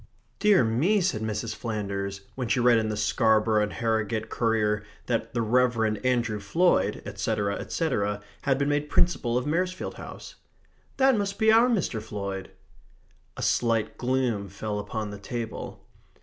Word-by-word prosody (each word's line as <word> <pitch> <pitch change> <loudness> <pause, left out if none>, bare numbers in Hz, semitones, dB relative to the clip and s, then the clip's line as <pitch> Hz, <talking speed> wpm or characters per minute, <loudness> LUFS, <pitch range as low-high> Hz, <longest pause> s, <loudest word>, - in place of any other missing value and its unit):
"Dear 210 -8 +5
me," 140 - +2
said 175 - 0
Mrs. 110 +1 -2
Flanders, 100 -3 -4
when 125 -2 -3
she 125 - +1
read 120 -1 +5
in 110 -1 -1
the 105 - -2
Scarborough 110 0 +3
and 105 - -1
Harrogate 110 -1 -1
Courier 110 -2 +1 0.2
that 120 0 -2
the 115 - +1
Rev. 115 -2 +2
Andrew 120 -4 +1
Floyd, 170 - +2
etc., 100 -1 -1
etc., 105 -11 -1 0.2
had 135 -2 +1
been 140 +1 0
made 145 0 0
Principal 125 -9 +2
of 125 - -1
Maresfield 180 +4 -1
House, - - -10 0.6
"that 265 -1 +5
must 200 -2 -2
be 220 0 +4
our 230 +2 +6
Mr. 180 - 0
Floyd." 100 -3 -5 0.9
A - - -4
slight 115 -2 +1
gloom 125 -6 0
fell 105 +2 -4
upon 105 +1 -4
the 100 - -8
table. 115 +1 -6
115 Hz, 150 wpm, -27 LUFS, 105-135 Hz, 0.9 s, our